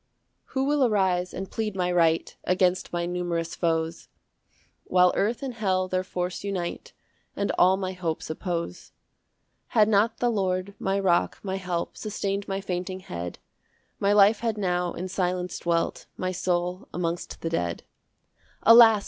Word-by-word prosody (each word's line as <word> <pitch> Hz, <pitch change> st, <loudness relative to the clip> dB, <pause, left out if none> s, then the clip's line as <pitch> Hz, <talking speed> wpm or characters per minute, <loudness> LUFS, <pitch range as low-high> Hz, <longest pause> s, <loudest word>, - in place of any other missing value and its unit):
1 -, -, -24 dB
Who 265 Hz, -, +1 dB
will 290 Hz, 0 st, +3 dB
arise 190 Hz, -6 st, +2 dB
and 190 Hz, +1 st, -6 dB
plead 215 Hz, -3 st, -2 dB
my 180 Hz, -1 st, 0 dB
right 165 Hz, -2 st, +2 dB
Against 180 Hz, 0 st, +1 dB
my 175 Hz, 0 st, -1 dB
numerous 175 Hz, -1 st, -2 dB
foes, 165 Hz, -1 st, -1 dB, 0.8 s
While 180 Hz, -1 st, +4 dB
earth 230 Hz, +6 st, 0 dB
and 265 Hz, -2 st, -3 dB
hell 190 Hz, -5 st, 0 dB
their 185 Hz, 0 st, 0 dB
force 180 Hz, 0 st, -3 dB
unite, 185 Hz, -4 st, -4 dB, 0.4 s
And 200 Hz, -, 0 dB
all 185 Hz, +1 st, +6 dB
my 190 Hz, -1 st, -2 dB
hopes 170 Hz, -3 st, -3 dB
oppose? 165 Hz, -, -4 dB, 0.8 s
2 -, -, -2 dB
Had 210 Hz, -1 st, +7 dB
not 220 Hz, +2 st, +3 dB
the 240 Hz, -1 st, +1 dB
Lord, 190 Hz, -2 st, -1 dB
my 195 Hz, +1 st, 0 dB
rock, 180 Hz, -3 st, +2 dB
my 190 Hz, -1 st, -2 dB
help, 180 Hz, -3 st, -3 dB
Sustain'd 200 Hz, -2 st, -3 dB
my 195 Hz, 0 st, -2 dB
fainting 185 Hz, 0 st, -4 dB
head, 85 Hz, -, -6 dB, 0.6 s
My 200 Hz, -, +2 dB
life 205 Hz, +1 st, +6 dB
had 225 Hz, -2 st, -1 dB
now 180 Hz, -3 st, 0 dB
in 185 Hz, -, -4 dB
silence 180 Hz, -1 st, -2 dB
dwelt, 170 Hz, -1 st, -1 dB
My 185 Hz, 0 st, -1 dB
soul 180 Hz, +4 st, -1 dB
amongst 170 Hz, 0 st, -3 dB
the 165 Hz, -, -2 dB
dead. 85 Hz, -, -1 dB, 0.8 s
3 230 Hz, -, +8 dB
"Alas! 225 Hz, -2 st, +9 dB
185 Hz, 160 wpm, -26 LUFS, 175-200 Hz, 0.8 s, Alas